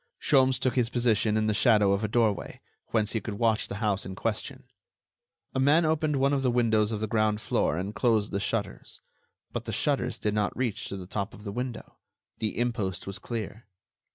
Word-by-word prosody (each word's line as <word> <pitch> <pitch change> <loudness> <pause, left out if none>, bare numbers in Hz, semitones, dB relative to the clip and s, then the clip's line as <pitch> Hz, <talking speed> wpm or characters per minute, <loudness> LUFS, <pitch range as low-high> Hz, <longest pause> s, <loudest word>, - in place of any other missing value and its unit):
Sholmes 130 -2 +4
took 130 -1 0
his 125 -3 +1
position 115 -3 +2
in 110 - +1
the 110 - +2
shadow 105 -3 +4
of 100 +2 0
a - - +1
doorway, 110 -3 0 0.3
whence 110 -2 0
he 110 - -1
could 105 - -5
watch 110 0 +1
the - - -5
house 105 -2 0
in 95 - -6
question. - - -3 0.9
A - - -1
man 150 +5 +4
opened 155 -1 +1
one 135 +1 +2
of 140 - +1
the 130 - +2
windows 115 -3 +2
of 110 -1 -3
the 110 - -1
ground 110 -1 +1
floor 80 - 0
and 95 +4 -3
closed 110 -3 +1
the 100 - -1
shutters. 100 -1 -3 0.5
But - - -4
the - - -4
shutters - - 0
did 105 - -1
not 105 -1 -1
reach 120 -5 -2
to 100 - -5
the 95 - -7
top 100 +4 -4
of 105 - -13
the 100 - -5
window. 125 +2 -6 0.4
The 110 -2 -2
impost 115 -6 -1
was 100 +1 -5
clear. 110 -1 -6
110 Hz, 210 wpm, -28 LUFS, 105-120 Hz, 0.9 s, Sholmes